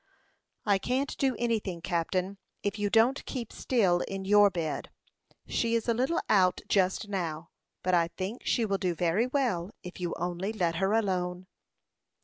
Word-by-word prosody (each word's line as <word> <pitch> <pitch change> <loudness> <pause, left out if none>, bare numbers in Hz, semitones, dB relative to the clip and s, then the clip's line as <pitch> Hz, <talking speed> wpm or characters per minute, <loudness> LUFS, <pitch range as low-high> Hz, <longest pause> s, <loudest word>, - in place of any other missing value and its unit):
"I 200 -2 +3
can't 260 +7 -1
do 265 -3 +2
anything, 220 -7 -1
captain, 180 +3 -1 0.2
if 205 +1 -2
you 205 0 +1
don't 230 +5 +3
keep 240 -5 -5
still 195 -9 +2
in 195 -1 -5
your 205 +1 +6
bed. 165 -4 -3 0.6
She 230 0 0
is 230 - -1
a 235 - +3
little 265 +9 +1
out 185 -3 +3
just 190 +2 +1
now; 170 -5 -3 0.3
but 185 - +1
I 170 -1 +4
think 190 +7 -5
she 235 - +1
will 200 -2 0
do 180 -2 0
very 180 +8 +1
well, 245 -10 0
if 180 0 -9
you 175 -2 -2
only 180 +4 -2
let 170 -6 0
her 195 +3 +1
alone." 185 -4 0
195 Hz, 165 wpm, -29 LUFS, 180-225 Hz, 0.6 s, your